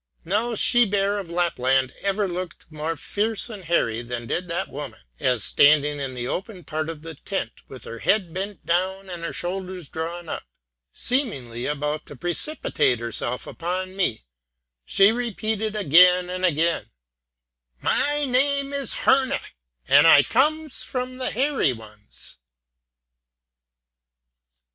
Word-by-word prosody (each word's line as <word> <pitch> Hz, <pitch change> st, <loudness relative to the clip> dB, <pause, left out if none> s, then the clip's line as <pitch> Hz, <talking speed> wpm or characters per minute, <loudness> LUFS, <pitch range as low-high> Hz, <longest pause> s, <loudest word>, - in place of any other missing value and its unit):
No 220 Hz, +7 st, 0 dB
she 240 Hz, +3 st, +4 dB
bear 200 Hz, 0 st, +1 dB
of 190 Hz, -4 st, -7 dB
Lapland 135 Hz, -7 st, +1 dB
ever 200 Hz, +1 st, 0 dB
looked 180 Hz, -1 st, -6 dB
more 155 Hz, +1 st, -3 dB
fierce 220 Hz, +6 st, -2 dB
and 205 Hz, -3 st, -8 dB
hairy 115 Hz, -9 st, +1 dB
than 120 Hz, 0 st, -5 dB
did 175 Hz, +9 st, -2 dB
that 170 Hz, 0 st, -2 dB
woman, 140 Hz, -, -8 dB, 0.2 s
as 125 Hz, -5 st, +1 dB
standing 145 Hz, 0 st, +4 dB
in 135 Hz, -2 st, -4 dB
the 120 Hz, 0 st, -3 dB
open 190 Hz, -, -4 dB
part 155 Hz, +1 st, -3 dB
of 160 Hz, -2 st, -7 dB
the 165 Hz, 0 st, -7 dB
tent, 190 Hz, +6 st, -4 dB, 0.2 s
with 130 Hz, -, -11 dB
her 115 Hz, -, -8 dB
head 180 Hz, -, +1 dB
bent 195 Hz, -1 st, -5 dB
down 190 Hz, +2 st, -1 dB
and 170 Hz, -1 st, -6 dB
her 170 Hz, -, -3 dB
shoulders 180 Hz, -2 st, -4 dB
drawn 170 Hz, +1 st, -5 dB
up, -, -, -4 dB, 0.5 s
seemingly 135 Hz, -, -1 dB
about 150 Hz, +1 st, -2 dB
to -, -, -10 dB
precipitate 175 Hz, -, 0 dB
herself 120 Hz, +2 st, -3 dB
upon 185 Hz, +2 st, -4 dB
me, 150 Hz, -, 0 dB, 0.6 s
she 195 Hz, +2 st, +5 dB
repeated 220 Hz, -2 st, -2 dB
again 180 Hz, 0 st, +6 dB
and 185 Hz, 0 st, -1 dB
again 165 Hz, 0 st, +1 dB, 0.9 s
"My 290 Hz, -, +1 dB
name 280 Hz, +2 st, +1 dB
is 280 Hz, -1 st, -1 dB
Herne, 265 Hz, -1 st, +4 dB, 0.5 s
and 155 Hz, -, +7 dB
I 145 Hz, -3 st, +8 dB
comes 295 Hz, -, +1 dB
of 255 Hz, 0 st, -2 dB
the 255 Hz, -, -1 dB
Hairy 265 Hz, -, +1 dB
Ones!" 110 Hz, -, -13 dB
180 Hz, 140 wpm, -24 LUFS, 150-215 Hz, 0.9 s, I